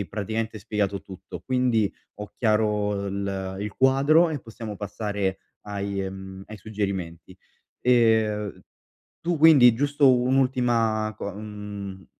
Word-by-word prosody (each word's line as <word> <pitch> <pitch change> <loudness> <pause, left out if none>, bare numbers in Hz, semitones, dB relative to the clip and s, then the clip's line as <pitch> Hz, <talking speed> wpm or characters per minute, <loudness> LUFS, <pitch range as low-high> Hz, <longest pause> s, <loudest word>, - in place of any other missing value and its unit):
hai 100 - -3
praticamente 110 +3 -3
spiegato 100 -1 -2
tutto 95 -1 -10
quindi 125 -5 +1 0.3
ho 105 0 -8
chiaro 105 -2 +1
il 95 -1 -3
il 105 0 -4
quadro 140 +6 +4
e 150 - -2
possiamo 115 -2 -8
passare 100 -1 -3 0.3
ai 100 -1 -3
ehm, 95 0 -7
ai 110 - -9
suggerimenti, 95 -5 -4 0.5
ehm, 110 -4 +2 0.6
tu 175 0 -1
quindi 140 -7 +7
giusto 145 0 +4
un'ultima 120 -4 +1
co 100 - -5
mhmm, 105 -2 -8
105 Hz, 120 wpm, -25 LUFS, 100-120 Hz, 0.6 s, quindi